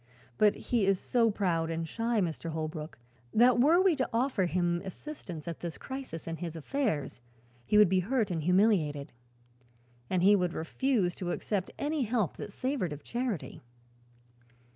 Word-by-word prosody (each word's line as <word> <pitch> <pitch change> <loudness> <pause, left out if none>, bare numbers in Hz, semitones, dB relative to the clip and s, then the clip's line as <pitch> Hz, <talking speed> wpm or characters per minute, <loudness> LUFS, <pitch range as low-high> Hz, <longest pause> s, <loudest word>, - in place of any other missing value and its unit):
But 210 -1 +5
he 225 -6 0
is 195 -2 +3
so 235 -2 +2
proud 175 -6 0
and 165 0 -2
shy, 230 +5 0
Mr. 165 -1 -3
Holbrook, 155 0 -5 0.4
that 240 +2 +5
were 310 +8 +5
we 375 -3 +4
to 260 - 0
offer 230 -5 +1
him 175 0 0
assistance 190 - -8
at 170 - -5
this 170 -2 -5
crisis 260 -13 -7
in 165 0 -3
his 170 -1 -5
affairs, 160 - -2 0.5
he 210 - +3
would 210 -1 +8
be 185 +1 +2
hurt 220 +1 0
and 165 -2 -1
humiliated. 175 -5 +2 1.0
And 180 -1 +1
he 205 +2 +7
would 180 -3 0
refuse 200 +1 0
to 180 - -4
accept 190 +1 -2
any 295 +1 -1
help 225 - 0
that - - -6
savored 255 - -2
of 145 0 -10
charity." 240 - -3
190 Hz, 165 wpm, -30 LUFS, 165-240 Hz, 1.0 s, would